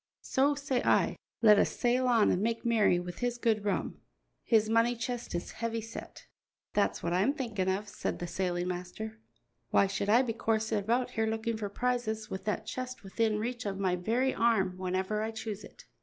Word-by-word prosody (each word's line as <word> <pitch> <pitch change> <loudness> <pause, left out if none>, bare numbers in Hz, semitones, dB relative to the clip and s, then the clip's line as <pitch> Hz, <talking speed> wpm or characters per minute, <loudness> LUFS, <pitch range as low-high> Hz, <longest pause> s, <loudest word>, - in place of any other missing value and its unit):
So 280 +2 +2
say 280 -3 -1
I, - - +3 0.3
let 210 -2 +8
us - - +3
sail 250 +1 +2
on 230 -4 +4
and 180 - +1
make 230 +2 -1
merry 215 -6 +4
with 175 0 -7
his 245 -1 -1
good 220 -3 +1
rum; 200 - -2 0.4
his 220 -2 +3
money 230 +2 +3
chest 235 -3 -4
is 175 - -3
heavy 225 0 -3
yet." - - -9 0.5
"That's 205 - +1
what 170 - 0
I'm 195 +10 +3
thinking 210 -9 -1
of," 195 +3 -1
said - - -3
the 175 - -4
sailing 175 0 -1
master. 185 +5 -5 0.5
"Why - - +4
should 200 +1 -2
I 235 +5 +6
be 235 -3 -2
coursing 220 -1 0
about 240 +5 0
here 225 -2 0
looking 225 +1 -1
for 210 -2 -4
prizes 220 -1 -1
with 190 - -5
that 215 0 -1
chest 255 +1 -5
within 215 +2 0
reach 240 +3 -3
of 195 -1 -3
my 190 -2 +1
very 235 +9 +1
arm 215 -6 +2
whenever 190 +3 -1
I 220 - -1
choose 220 -2 -5
it?" - - -14
220 Hz, 195 wpm, -31 LUFS, 200-235 Hz, 0.5 s, let